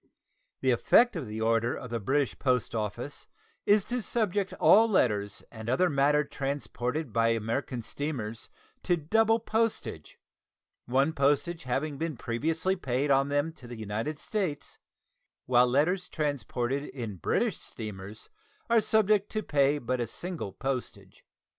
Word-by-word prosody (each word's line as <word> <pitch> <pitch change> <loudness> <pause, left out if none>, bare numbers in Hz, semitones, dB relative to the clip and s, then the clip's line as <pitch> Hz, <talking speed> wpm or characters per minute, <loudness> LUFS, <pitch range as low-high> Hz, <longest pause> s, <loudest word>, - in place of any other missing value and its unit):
The 130 - +3
effect 230 - +4
of 150 -8 -4
the 110 +1 -5
order 115 +1 +2
of 125 - -8
the 115 - -1
British, 135 +6 0
post 125 -4 +1
office 115 +5 -4 0.4
is 205 0 +5
to 245 +1 -2
subject 205 -4 -1
all 225 +2 +6
letters 105 - +1
and 110 0 -7
other 175 +8 +3
matter 145 +1 +3
transported 140 -1 -3
by 115 +1 +3
American 115 +2 -1
steamers 115 -4 -5 0.3
to 175 -1 +1
double 225 +8 +3
postage, 225 0 -2 0.7
one 135 +5 +2
postage 145 +3 +1
having 140 +3 -2
been 160 -4 -3
previously 160 +12 -1
paid 140 -4 -1
on 135 +1 +3
them 145 +3 0
to 125 - -13
the 120 -1 -8
United 110 +8 -3
States, 185 -6 -3 0.7
while 125 0 +5
letters 170 +9 +1
transported 140 -3 -2
in 115 -9 -6
British 80 - 0
steamers 105 -1 -8 0.4
are 230 -1 +6
subject 215 -2 +3
to 215 -1 -1
pay 140 0 +2
but 130 -2 -2
a 120 - -1
single 170 - -5
postage. 135 +3 -5
140 Hz, 140 wpm, -29 LUFS, 120-165 Hz, 0.7 s, all